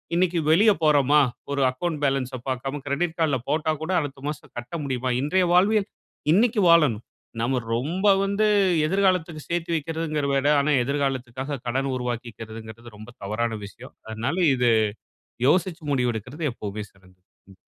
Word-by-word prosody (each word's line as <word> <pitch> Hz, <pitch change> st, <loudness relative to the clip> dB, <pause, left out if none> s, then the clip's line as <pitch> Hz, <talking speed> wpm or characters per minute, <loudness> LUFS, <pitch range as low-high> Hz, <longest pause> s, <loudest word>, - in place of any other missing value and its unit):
இன்னிக்கு 175 Hz, -1 st, +2 dB
வெளிய 210 Hz, +6 st, +6 dB
போறோமா, 150 Hz, -1 st, +4 dB, 0.3 s
ஒரு 140 Hz, -1 st, 0 dB
அக்கவுண்ட் 150 Hz, +3 st, -3 dB
பேலன்ஸ் 135 Hz, -1 st, 0 dB, 0.2 s
பாக்காம 135 Hz, +2 st, -3 dB
கிரெடிட் 160 Hz, +4 st, -1 dB
கார்டுல 150 Hz, -5 st, +2 dB
போட்டா 155 Hz, +1 st, +1 dB
கூட 180 Hz, -, -3 dB
அடுத்த 140 Hz, -1 st, -6 dB
மாசம் 150 Hz, -, -8 dB
கட்ட 120 Hz, +7 st, -7 dB
முடியுமா? 130 Hz, -2 st, -2 dB
இன்றைய 180 Hz, +5 st, +2 dB
வாழ்வியல், 200 Hz, +3 st, +3 dB, 0.5 s
இன்னிக்கு 220 Hz, +1 st, +3 dB
வாழணும். 145 Hz, -10 st, +4 dB, 0.4 s
நாம 125 Hz, +2 st, +1 dB, 0.2 s
ரொம்ப 170 Hz, -, -1 dB, 0.2 s
வந்து 200 Hz, +2 st, +1 dB, 0.4 s
எதிர்காலத்துக்கு 180 Hz, -3 st, +1 dB
சேத்தி 170 Hz, 0 st, -2 dB
வக்கிறதுங்கிறத 155 Hz, -2 st, -2 dB
விட 135 Hz, +1 st, +1 dB
ஆனா, 145 Hz, +2 st, +1 dB
எதிர்காலத்துக்காக 135 Hz, -1 st, -2 dB
கடன் 135 Hz, +3 st, -1 dB
உருவாக்கிக்குறதுங்கிறது 115 Hz, -2 st, -7 dB
ரொம்ப 110 Hz, +3 st, -11 dB
தவறான 110 Hz, +2 st, -2 dB
விஷயம். 120 Hz, +5 st, -13 dB, 0.2 s
அதனால 120 Hz, +10 st, -2 dB, 0.2 s
இது 125 Hz, -2 st, +3 dB, 0.8 s
யோசிச்சு 175 Hz, -1 st, +1 dB
முடிவெடுக்கிறது 125 Hz, +4 st, -2 dB
எப்பவுமே 105 Hz, -1 st, -6 dB
சிறந்தது. 95 Hz, -1 st, -24 dB, 0.3 s
ம். 95 Hz, -, -18 dB
140 Hz, 135 wpm, -24 LUFS, 120-165 Hz, 0.8 s, வெளிய